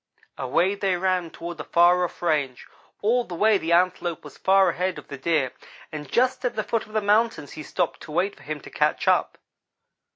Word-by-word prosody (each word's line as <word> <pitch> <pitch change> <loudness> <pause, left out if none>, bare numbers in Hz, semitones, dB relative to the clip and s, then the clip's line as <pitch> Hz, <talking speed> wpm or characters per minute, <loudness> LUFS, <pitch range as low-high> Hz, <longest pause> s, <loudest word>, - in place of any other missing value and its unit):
"Away 165 +9 +1
they 195 -2 0
ran 180 -2 0
toward 170 0 -8
the - - -4
far 175 +1 +4
off 175 - -5
range. 145 -7 0 0.4
All 240 +4 +3
the 180 - -8
way 210 +2 +3
the 165 -1 -3
Antelope 175 -1 +1
was 150 - -12
far 190 -1 +4
ahead 180 +1 -2
of - - -11
the 140 - -6
Deer; 145 -4 +1 0.4
and 150 -1 -7
just 255 +1 +2
at 250 - -1
the 215 - -1
foot 230 -1 -2
of 215 - -16
the 215 - +1
mountains 205 -7 +1
he 155 - -8
stopped 175 +3 -2
to 155 - -10
wait 185 +6 0
for - - -19
him 150 +2 -5
to - - -12
catch - - 0
up. - - +2
180 Hz, 215 wpm, -24 LUFS, 155-200 Hz, 0.4 s, far